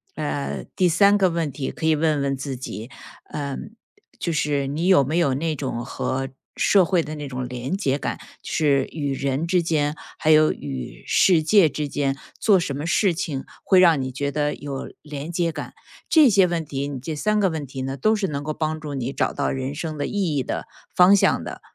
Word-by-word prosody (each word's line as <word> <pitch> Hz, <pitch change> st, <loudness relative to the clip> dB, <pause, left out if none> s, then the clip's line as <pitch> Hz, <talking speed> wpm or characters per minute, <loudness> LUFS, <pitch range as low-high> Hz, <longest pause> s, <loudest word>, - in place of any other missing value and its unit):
呃， 145 Hz, -2 st, -3 dB
第 185 Hz, -2 st, +3 dB
三 200 Hz, +4 st, +5 dB
个 190 Hz, -2 st, +3 dB
问 165 Hz, -3 st, -1 dB
题 135 Hz, 0 st, -4 dB
可 160 Hz, -, -5 dB
以 155 Hz, -, +4 dB
问 150 Hz, -2 st, +1 dB
问 135 Hz, 0 st, 0 dB
自 135 Hz, 0 st, -4 dB
己， 115 Hz, -1 st, -7 dB, 0.4 s
呃， 140 Hz, -2 st, -3 dB, 0.6 s
就 170 Hz, -, -1 dB
是 145 Hz, -2 st, 0 dB
你 155 Hz, +5 st, -2 dB
有 185 Hz, -8 st, +6 dB
没 155 Hz, +5 st, -1 dB
有 140 Hz, -6 st, +3 dB
那 155 Hz, +3 st, -1 dB
种 125 Hz, -4 st, -3 dB
和 135 Hz, +1 st, -3 dB, 0.3 s
社 195 Hz, -3 st, +4 dB
会 175 Hz, -3 st, +2 dB
的 155 Hz, +1 st, -6 dB
那 145 Hz, -1 st, -6 dB
种 125 Hz, -1 st, -4 dB
联 125 Hz, +8 st, -3 dB
结 140 Hz, -8 st, 0 dB
感， -, -, -3 dB, 0.2 s
就 -, -, -9 dB
是 140 Hz, -3 st, +2 dB
与 145 Hz, -3 st, -2 dB
人 135 Hz, +3 st, -1 dB
之 180 Hz, 0 st, +2 dB
间， 150 Hz, -3 st, 0 dB, 0.2 s
还 155 Hz, -, +2 dB
有 155 Hz, 0 st, +5 dB
与 65 Hz, -3 st, -7 dB
世 170 Hz, -5 st, +4 dB
界 195 Hz, 0 st, +5 dB
之 150 Hz, -1 st, -3 dB
间， 135 Hz, -1 st, 0 dB, 0.2 s
做 210 Hz, -5 st, +5 dB
什 155 Hz, -5 st, -2 dB
么 155 Hz, +3 st, -4 dB
事 190 Hz, 0 st, +3 dB
情 160 Hz, -6 st, -3 dB, 0.2 s
会 190 Hz, -, +4 dB
让 165 Hz, -6 st, +5 dB
你 130 Hz, -, -3 dB
觉 140 Hz, +2 st, -3 dB
得 150 Hz, 0 st, -1 dB
有 140 Hz, -2 st, -6 dB
联 150 Hz, +1 st, -7 dB
结 170 Hz, -1 st, 0 dB
感。 -, -, -7 dB, 0.3 s
这 310 Hz, -6 st, +6 dB
些 195 Hz, -3 st, +5 dB
问 170 Hz, -2 st, -1 dB
题， 140 Hz, -1 st, -4 dB
你 140 Hz, -2 st, -5 dB
这 155 Hz, +5 st, -5 dB
3 210 Hz, +8 st, +1 dB
个 190 Hz, -, +3 dB
问 155 Hz, -4 st, -4 dB
题 130 Hz, 0 st, -6 dB
呢， 135 Hz, +1 st, -4 dB
都 215 Hz, -, +3 dB
是 200 Hz, -2 st, -1 dB
能 140 Hz, -1 st, -3 dB
够 155 Hz, +1 st, -3 dB
帮 155 Hz, 0 st, -2 dB
助 150 Hz, -2 st, -6 dB
你 130 Hz, -1 st, -3 dB
找 -, -, -1 dB
到 -, -, -1 dB
人 135 Hz, +2 st, -3 dB
生 155 Hz, -1 st, -4 dB
的 145 Hz, -, -1 dB
意 185 Hz, -8 st, -1 dB
义 130 Hz, -, +1 dB
的 -, -, -4 dB, 0.3 s
方 180 Hz, +2 st, +7 dB
向 200 Hz, -, +3 dB
的， -, -, -7 dB
150 Hz, 235 characters per minute, -23 LUFS, 135-170 Hz, 0.6 s, 方